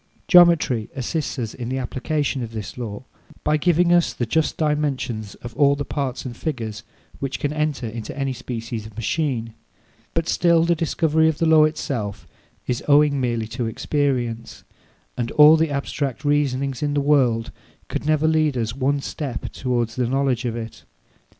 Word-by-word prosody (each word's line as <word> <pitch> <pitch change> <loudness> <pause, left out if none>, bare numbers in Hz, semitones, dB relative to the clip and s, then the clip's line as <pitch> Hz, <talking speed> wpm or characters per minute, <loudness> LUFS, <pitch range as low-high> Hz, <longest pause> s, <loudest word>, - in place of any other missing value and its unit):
Geometry 170 - +5
assists 145 +4 -3
us 115 -4 -3
in 120 -2 -6
the 130 - -2
application 135 +2 -2
of 115 -1 -6
this 110 -2 -6
law, 115 -2 -6 0.4
by 150 - +2
giving 175 +2 +3
us 175 -1 +3
the 120 - -2
just 160 +7 0
dimensions 140 -9 -1
of 120 -1 -8
all 140 +1 +4
the 145 0 -4
parts 135 -3 -3
and 120 -2 -5
figures 115 -7 -4 0.4
which 135 -1 -3
can 145 0 -1
enter 150 -5 -1
into 110 +3 -7
any 135 -1 -1
species 115 -3 -5
of 110 - -15
machine; 115 -1 -2 0.6
but 165 0 0
still 170 -2 +3
the 170 +1 +3
discovery 160 -1 +2
of 155 - -2
the 165 - +1
law 160 -1 +6
itself 120 -9 -3 0.4
is 125 -1 -2
owing 145 -1 +4
merely 120 -3 -1
to 120 +1 -3
experience, 120 -3 -2 0.5
and 120 -1 -1
all 150 +1 +8
the 160 0 +1
abstract 140 -1 -3
reasonings 140 -3 0
in 145 -1 0
the - - +3
world 130 -6 +2 0.4
could - - -4
never 155 +1 +2
lead 155 -4 +2
us 115 0 -2
one 140 +1 0
step 140 -2 -5
towards 120 -2 -1
the 125 -2 +1
knowledge 135 -1 0
of 115 -2 -2
it. 115 -1 -7
135 Hz, 170 wpm, -22 LUFS, 120-150 Hz, 0.6 s, all